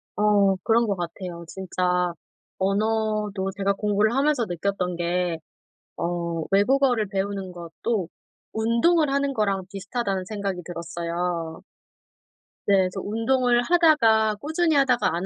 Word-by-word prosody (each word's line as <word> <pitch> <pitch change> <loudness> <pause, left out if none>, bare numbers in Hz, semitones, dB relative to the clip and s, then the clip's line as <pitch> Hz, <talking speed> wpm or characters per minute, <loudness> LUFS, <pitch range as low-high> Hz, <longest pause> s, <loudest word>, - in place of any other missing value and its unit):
아 - - -2 0.4
그런 230 0 +3
것 200 - 0
같아요. 175 0 -6
진짜 180 -1 -1 0.4
언어도 210 0 0
제가 200 0 +1
공부를 210 +2 +1
하면서 280 -4 +2
느꼈던 180 0 -2
게 175 -1 -1 0.6
어 170 -1 -2
외국어를 245 +2 +3
배우는 195 -1 -3
것도 175 +3 -3 0.4
운동을 235 +9 +2
하는 280 0 +1
거랑 200 -5 0
비슷하다는 195 -1 -3
생각이 200 -3 -3
들었어요. 170 -1 -4 1.0
네. 200 - +4
그래서 190 0 +1
운동을 240 +3 +1
하다가 240 -11 +4
꾸준히 320 +2 +1
하다가 255 -8 +3
안 175 - -2
200 Hz, 275 characters per minute, -24 LUFS, 180-230 Hz, 1.0 s, 네